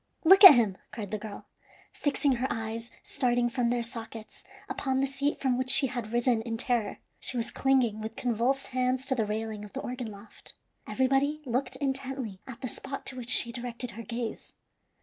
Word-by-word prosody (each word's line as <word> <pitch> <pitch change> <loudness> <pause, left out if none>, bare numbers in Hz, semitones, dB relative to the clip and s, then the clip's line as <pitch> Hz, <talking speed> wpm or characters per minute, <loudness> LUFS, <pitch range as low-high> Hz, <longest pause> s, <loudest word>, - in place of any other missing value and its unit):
look 385 +4 +7
at 365 -7 +13
him!" 215 -6 +1
cried 205 -4 -6
the 215 - -2
girl, 210 -1 -8 0.5
fixing 285 -2 +1
her 255 +2 -1
eyes, 225 +1 -4
starting 245 -1 0
from 245 -1 0
their 240 0 0
sockets, 230 -2 -8 0.2
upon 265 -1 -1
the 270 - +2
seat, 275 +2 -1
from 255 -2 0
which 260 0 -1
she 270 +1 +8
had 240 -4 -4
risen 240 -1 +2
in 225 0 -4
terror. 235 -3 -1 0.2
She 255 - -1
was 235 0 -1
clinging 250 -5 +1
with 220 +1 -6
convulsed 250 +2 0
hands 255 +1 0
to 265 - 0
the 225 -5 -1
railing 215 0 -4
of 210 - -11
the 270 - -4
organ 250 -2 -5
loft. 205 0 -10 0.3
Everybody 275 +3 +1
looked 255 +1 -2
intently 265 -6 -3
at 260 -3 -9
the 255 - -3
spot 275 +3 -5
to 260 - -5
which 245 -2 -6
she 235 -2 +3
directed 240 0 -5
her 230 - -8
gaze. 230 0 -6
245 Hz, 190 wpm, -28 LUFS, 225-265 Hz, 0.5 s, at